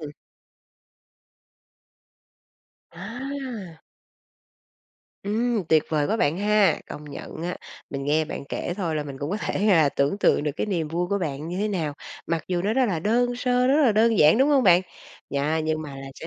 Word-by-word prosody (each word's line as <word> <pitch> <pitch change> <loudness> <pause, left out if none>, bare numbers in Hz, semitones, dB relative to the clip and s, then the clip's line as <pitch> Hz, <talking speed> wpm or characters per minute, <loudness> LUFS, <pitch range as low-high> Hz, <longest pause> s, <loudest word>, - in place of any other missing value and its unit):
Ừm. 150 -2 -7 2.8
À. 230 - -7 1.4
Ừm, 220 0 0
Tuyệt 155 -1 +4
vời 150 -2 +1
quá 220 - 0
bạn 150 -2 +1
ha! 210 0 +3
Công 150 - -8
nhận 155 +3 -8
á, 180 +1 -3 0.3
mình 140 0 -4
nghe 155 +2 +2
bạn 145 - -6
kể 175 - -3
thôi 170 -6 -2
là 150 - -1
mình 135 -2 -8
cũng 145 +4 -4
có 205 - -1
thể 205 - -1
là 165 -8 +5
tưởng 140 +8 0
tượng 145 - +3
được 150 - 0
cái - - -1
niềm 170 -6 -1
vui 175 +3 -1
của 200 - 0
bạn 155 -2 -4
như 180 - -4
thế 210 +1 0
nào, 160 -7 -2 0.3
mặc 165 -1 -2
dù 175 -1 0
nó 210 +2 0
rất 260 +1 +3
là 175 -5 -1
đơn 240 +5 +1
sơ, 250 0 +1
rất 290 +3 +4
là 235 -6 +4
đơn 225 0 +3
giản, 155 +8 +6
đúng 270 +3 +4
hông 280 -3 +4
bạn? 180 -1 +6 0.5
Yeah, 150 +3 0
nhưng 155 0 -1
mà 140 -2 -8
là 135 0 -8
sẽ 160 - -9
180 Hz, 190 wpm, -24 LUFS, 155-220 Hz, 2.8 s, giản